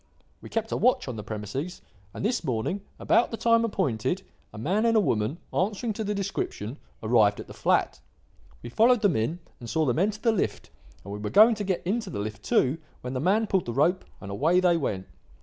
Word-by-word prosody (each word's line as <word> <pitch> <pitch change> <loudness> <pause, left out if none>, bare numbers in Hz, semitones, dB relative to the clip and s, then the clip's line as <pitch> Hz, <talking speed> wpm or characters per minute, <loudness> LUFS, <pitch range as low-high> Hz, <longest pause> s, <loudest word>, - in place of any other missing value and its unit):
We - - -10
kept 225 -1 -2
a - - 0
watch 250 - +2
on 125 - -4
the 105 - -5
premises, 110 - -5 0.3
and - - -5
this 240 +4 0
morning, 125 - -2 0.2
about 240 - +3
the 225 - -5
time 230 0 +3
appointed, 180 - -1 0.3
a 110 - -11
man 185 - 0
and 230 -1 +4
a - - +7
woman, 120 - 0 0.2
answering 210 +4 0
to 220 - -4
the 210 0 -2
description, 165 - -3 0.3
arrived 110 -2 +3
at - - -6
the - - -11
flat. - - +1 0.6
We - - -7
followed 235 - +4
them 200 -6 +3
in 115 +10 0 0.2
and 120 - -8
saw 160 -1 +1
them 130 +2 +1
enter 210 +3 +1
the 230 - +2
lift, 215 - -2 0.3
and 100 - -7
we 105 - -5
were 105 0 -3
going 220 - +7
to 210 -1 -4
get 190 -3 -2
into 215 +2 -1
the - - -5
lift 105 +1 -4
too, 135 +9 +2 0.2
when 125 +1 -5
the 130 - -2
man 200 +9 +2
pulled 190 -4 0
the 120 - -2
rope, 165 +8 +2 0.2
and 95 - -8
away 160 - +3
they 180 -2 +4
went. 100 - -2
175 Hz, 220 wpm, -27 LUFS, -, 0.6 s, a